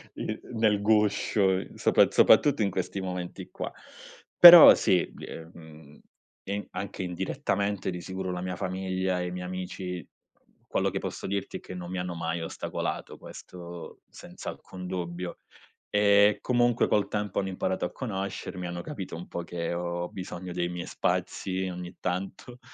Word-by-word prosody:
i - - -4
nel 110 -3 +2
guscio, 100 -2 +2
sopra- - - +4
soprattutto 145 -5 +5
in 100 - +2
questi 95 +1 -3
momenti 90 -1 -5
qua. - - -5 0.7
Però 175 -2 +12
sì, 90 - +2
bie 80 0 -9
ehm, 80 -2 -14 0.5
in 100 +1 -3
anche 100 -1 -5
indirettamente 95 - -2
di 90 -1 -4
sicuro 95 0 -4
la 90 - -4
mia 90 0 -3
famiglia 95 0 -2
e 90 - -2
i 90 - -5
miei 90 0 -5
amici, 90 -1 -5 0.6
quello - - 0
che - - -2
posso - - -6
dirti 100 0 -3
che - - -10
non 90 -1 -7
mi 95 - -4
hanno 90 -1 -3
mai 85 0 -3
ostacolato, 80 - -4
questo 85 -1 -10
senza - - -9
alcun 90 -1 -10
dubbio. 90 -1 -5 0.5
Ehm, 105 0 +5
comunque 120 -1 +2
col 105 - +2
tempo 105 -2 -2
hanno 95 - -2
imparato 95 -1 -2
a - - -4
conoscermi, 95 -5 -5
hanno 85 0 -5
capito 95 - -6
un 85 - -8
po' 85 - -5
che 85 -1 -4
ho 85 0 -3
bisogno 90 -1 -7
dei 85 0 -1
miei 90 0 -5
spazi 95 0 -2
ogni 90 0 -7
tanto, 95 +7 -4
95 Hz, 155 wpm, -28 LUFS, 90-100 Hz, 0.7 s, Però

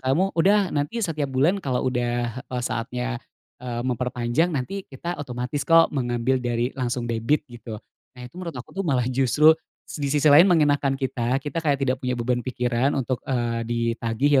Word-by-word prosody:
"kamu 150 +10 +1
udah, 195 +2 +4
nanti 150 +11 -1
setiap 155 -5 -2
bulan 145 +10 +2
kalau 130 -5 -1
udah, 120 0 -2
eee, 125 -1 -4
saatnya, 125 +1 -3 0.4
eee, 120 -1 -4
memperpanjang 125 +4 0
nanti 185 +9 -3
kita 170 +6 -5
otomatis 125 +1 -4
kok 165 +1 +5
mengambil 120 -1 0
dari 120 0 -1
langsung 125 -1 -1
debit" 115 +7 +1
gitu. 115 -2 -8 0.4
Nah, 125 - -10
itu 125 - -12
menurut 170 -3 -6
aku 125 - -8
tuh 195 +1 -3
malah 130 -5 +2
justru 135 +5 +5 0.5
di 140 -1 -1
sisi 150 +2 +1
lain 155 +6 +8
mengenakkan 145 -5 +3
kita, 130 -2 -1
kita 150 +3 -4
kayak 145 -3 +1
tidak 130 -1 +1
punya 125 -1 0
beban 125 +1 0
pikiran 125 +1 0
untuk, 130 -2 -1
eee, 120 -3 0
ditagih 115 +4 +1
130 Hz, 170 wpm, -24 LUFS, 120-145 Hz, 0.5 s, lain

